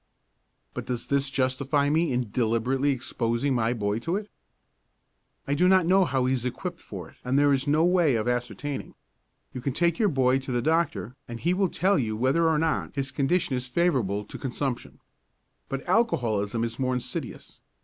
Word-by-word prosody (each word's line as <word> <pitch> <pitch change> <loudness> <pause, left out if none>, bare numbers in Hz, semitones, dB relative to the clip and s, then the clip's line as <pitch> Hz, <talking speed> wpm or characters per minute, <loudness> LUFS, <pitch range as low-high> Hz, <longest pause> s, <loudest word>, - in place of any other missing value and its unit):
But - - -6
does 120 -2 -3
this 140 -1 +1
justify 135 +2 +1
me 160 +1 +2
in 125 -4 -1
deliberately 125 +4 +1
exposing 120 0 -1
my 115 -2 +1
boy 105 -2 -1
to 165 +9 -2
it? 210 0 -5 1.2
I 140 - +1
do 175 +5 +3
not 185 -2 +5
know 190 +2 +4
how 130 -4 0
he 130 - +2
is 125 -3 -1
equipped 170 +8 -4
for 95 -4 -8
it - - -22
and 125 +2 +1
there 145 0 +5
is 135 +1 0
no 155 +3 +3
way 175 -7 +3
of 110 +1 -1
ascertaining. 125 +3 -3 0.6
You 125 - -5
can 135 +1 -2
take 170 +2 +1
your 215 -3 +4
boy 130 -3 +2
to 135 0 -6
the 120 - +1
doctor 135 - 0
and 120 -1 -7
he 175 +7 +1
will 190 0 +1
tell 190 +1 +2
you 110 -4 -2
whether 140 +8 +2
or 160 - +2
not 160 -2 -1
his 135 -1 -2
condition 145 0 +1
is 125 0 -3
favourable 125 - +1
to - - -9
consumption. 130 -1 -4 0.7
But 135 0 -4
alcoholism 115 - +1
is 115 +1 -4
more 130 -1 0
insidious. 125 - -6
135 Hz, 190 wpm, -26 LUFS, 120-160 Hz, 1.2 s, not